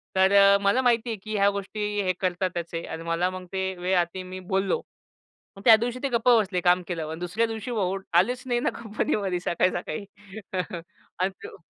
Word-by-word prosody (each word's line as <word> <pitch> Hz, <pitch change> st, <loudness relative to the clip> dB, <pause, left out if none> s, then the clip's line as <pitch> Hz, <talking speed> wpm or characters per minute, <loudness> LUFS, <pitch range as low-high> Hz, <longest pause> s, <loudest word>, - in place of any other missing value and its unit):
तर 190 Hz, +1 st, +4 dB
अ, 200 Hz, 0 st, +7 dB
मला 200 Hz, +6 st, +3 dB
माहिती 240 Hz, -1 st, +2 dB
आहे 220 Hz, -, -2 dB
की 215 Hz, 0 st, -4 dB
ह्या 200 Hz, 0 st, +4 dB
गोष्टी 200 Hz, +1 st, -4 dB, 0.2 s
हे 185 Hz, 0 st, +1 dB
करतातच 180 Hz, -2 st, -2 dB
आहे. 165 Hz, 0 st, -3 dB
आणि 165 Hz, 0 st, -6 dB
मला 170 Hz, +2 st, 0 dB
मग 185 Hz, 0 st, -7 dB
ते 190 Hz, 0 st, -1 dB
वेळ 180 Hz, +1 st, +1 dB
आलती 175 Hz, +2 st, -1 dB
मी 185 Hz, 0 st, -8 dB
बोललो. 190 Hz, +1 st, 0 dB, 0.8 s
मग 195 Hz, -, -10 dB
त्या 225 Hz, -3 st, +10 dB
दिवशी 240 Hz, +3 st, -2 dB
ते 275 Hz, -, +1 dB
गप्प 240 Hz, 0 st, -1 dB
बसले, 210 Hz, -6 st, +3 dB
काम 180 Hz, +1 st, +4 dB
केल्यावर 160 Hz, -3 st, -4 dB
आणि 160 Hz, -, -6 dB
दुसऱ्या 180 Hz, +6 st, 0 dB
दिवशी 225 Hz, +2 st, -5 dB
भाऊ 195 Hz, -4 st, 0 dB, 0.2 s
आलेच 245 Hz, +6 st, 0 dB
नाही 240 Hz, -2 st, 0 dB
ना, -, -, +1 dB
कंपनीमध्ये 205 Hz, -4 st, -1 dB
सकाळी 180 Hz, +1 st, +1 dB
सकाळी. 175 Hz, +2 st, -4 dB, 1.1 s
आणि 185 Hz, -, +2 dB
तो -, -, -9 dB
190 Hz, 200 wpm, -26 LUFS, 180-220 Hz, 1.1 s, त्या